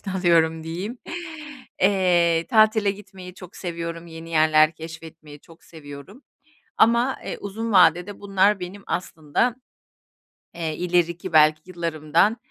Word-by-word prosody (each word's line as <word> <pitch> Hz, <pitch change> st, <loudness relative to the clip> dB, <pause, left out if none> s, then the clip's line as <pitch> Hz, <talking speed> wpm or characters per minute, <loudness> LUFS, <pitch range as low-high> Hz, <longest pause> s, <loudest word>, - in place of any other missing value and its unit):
için 195 Hz, -, -7 dB
alıyorum 165 Hz, -3 st, +2 dB
diyeyim. 190 Hz, +9 st, -6 dB, 0.8 s
Eee, 175 Hz, -4 st, +2 dB
tatile 215 Hz, -2 st, +4 dB
gitmeyi 195 Hz, -2 st, -11 dB
çok 180 Hz, -1 st, -13 dB
seviyorum. 170 Hz, -1 st, -6 dB
Yeni 165 Hz, 0 st, -10 dB
yerler 155 Hz, 0 st, +4 dB
keşfetmeyi 160 Hz, -2 st, -11 dB
çok 165 Hz, +2 st, -19 dB
seviyorum 155 Hz, -, -12 dB, 0.5 s
ama, 235 Hz, +4 st, +3 dB
eee, -, -, -5 dB
uzun 220 Hz, +3 st, -5 dB
vadede 180 Hz, +1 st, +3 dB
bunlar 195 Hz, 0 st, +2 dB
benim 195 Hz, +3 st, -8 dB
aslında, 175 Hz, +7 st, -2 dB, 1.0 s
eee, 160 Hz, -2 st, -4 dB
ileriki 175 Hz, 0 st, -1 dB
belki 155 Hz, 0 st, +5 dB
yıllarımdan, 170 Hz, +3 st, 0 dB
175 Hz, 115 wpm, -23 LUFS, 160-195 Hz, 1.0 s, belki